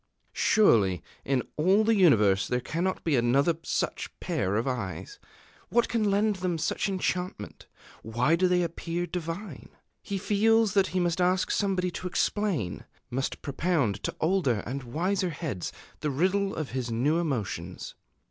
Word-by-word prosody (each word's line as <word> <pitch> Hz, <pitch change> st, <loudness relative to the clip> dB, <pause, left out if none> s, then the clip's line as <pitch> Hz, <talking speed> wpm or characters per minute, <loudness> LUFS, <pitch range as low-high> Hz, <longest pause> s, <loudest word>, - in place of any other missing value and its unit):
Surely 105 Hz, -, +3 dB, 0.2 s
in 135 Hz, -2 st, 0 dB
all 190 Hz, +7 st, +4 dB
the 225 Hz, +1 st, +3 dB
universe 105 Hz, -, +4 dB
there 125 Hz, -, 0 dB
cannot 175 Hz, +8 st, -2 dB
be 160 Hz, -4 st, +2 dB
another 135 Hz, +7 st, +3 dB
such -, -, -2 dB
pair 95 Hz, +2 st, -1 dB
of 115 Hz, +5 st, 0 dB
eyes! 125 Hz, -, -4 dB, 0.5 s
What 240 Hz, 0 st, +2 dB
can 220 Hz, -3 st, +1 dB
lend 205 Hz, +1 st, +2 dB
them 180 Hz, -2 st, -1 dB
such 160 Hz, -, -1 dB
enchantment? 180 Hz, -, -3 dB, 0.3 s
Why 120 Hz, +8 st, +1 dB
do 185 Hz, +2 st, +2 dB
they 180 Hz, 0 st, +2 dB
appear 170 Hz, +1 st, -3 dB
divine?... 175 Hz, +4 st, -6 dB, 0.3 s
He 200 Hz, -, -4 dB
feels 215 Hz, +2 st, +3 dB
that 195 Hz, -2 st, +3 dB
he 185 Hz, -, -1 dB
must 175 Hz, 0 st, 0 dB
ask 180 Hz, +1 st, +2 dB
somebody 185 Hz, -3 st, 0 dB
to 180 Hz, -, -5 dB
explain, 180 Hz, -, -1 dB, 0.3 s
must 135 Hz, +2 st, -3 dB
propound 140 Hz, -, 0 dB
to -, -, -3 dB
older 155 Hz, -, +1 dB
and 135 Hz, +4 st, -4 dB
wiser 180 Hz, +9 st, -1 dB
heads 140 Hz, -, -4 dB, 0.3 s
the 150 Hz, -, -1 dB
riddle 190 Hz, +7 st, +1 dB
of 155 Hz, -3 st, -4 dB
his 125 Hz, -1 st, -3 dB
new 135 Hz, +9 st, +1 dB
emotions. 105 Hz, -, -3 dB
170 Hz, 150 wpm, -28 LUFS, 125-190 Hz, 0.5 s, all